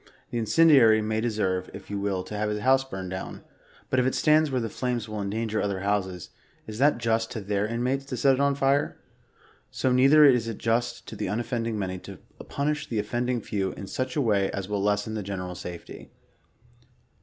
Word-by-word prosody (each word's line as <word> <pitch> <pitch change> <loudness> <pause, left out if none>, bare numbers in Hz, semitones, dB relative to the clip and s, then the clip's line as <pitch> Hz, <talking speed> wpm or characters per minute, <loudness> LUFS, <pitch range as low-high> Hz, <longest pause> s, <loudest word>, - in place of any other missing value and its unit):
The 120 - -1
incendiary 120 -3 +5
may 110 0 -1
deserve, 105 -5 -1
if 100 0 -10
you 100 - -2
will, 100 -2 -1
to 105 - -8
have 105 0 -1
his 105 0 -2
house 130 +3 +4
burnt 95 -8 -7
down, 95 - -6 0.5
but 130 - +3
if 125 - +2
it 130 - 0
stands 155 0 +4
where 130 -2 0
the 115 - -2
flames 120 -1 -3
will 110 -1 -5
en 100 - -3
danger 110 +1 -2
other 100 -2 -2
houses, 95 -3 -2 0.3
is 110 +3 -6
it 145 -1 +4
just 115 -1 0
to 115 - -5
their 100 0 -1
inmates 125 +4 -1
to 130 -2 -5
set 135 +3 +4
it 130 - -1
on 140 0 +2
fire? 140 +1 +1 0.7
So 130 - -1
neither 135 +4 +6
is 125 -5 +4
it 115 - -4
just 115 +1 -1
to - - -8
the 105 -1 -3
unoffending 115 +1 -2
many, 95 -2 -3
to - - -10 0.3
punish 150 +1 -1
the 115 - -2
of 105 - 0
fending 120 +2 -1
few 95 -2 -2
in - - -8
such 130 +6 -3
a 150 - +2
way 100 -5 +2
as 95 -2 -4
will 105 -1 -2
lessen 105 +2 0
the 110 - -3
general 95 -2 -5
safety. 90 -1 -9
110 Hz, 210 wpm, -26 LUFS, 100-130 Hz, 0.7 s, neither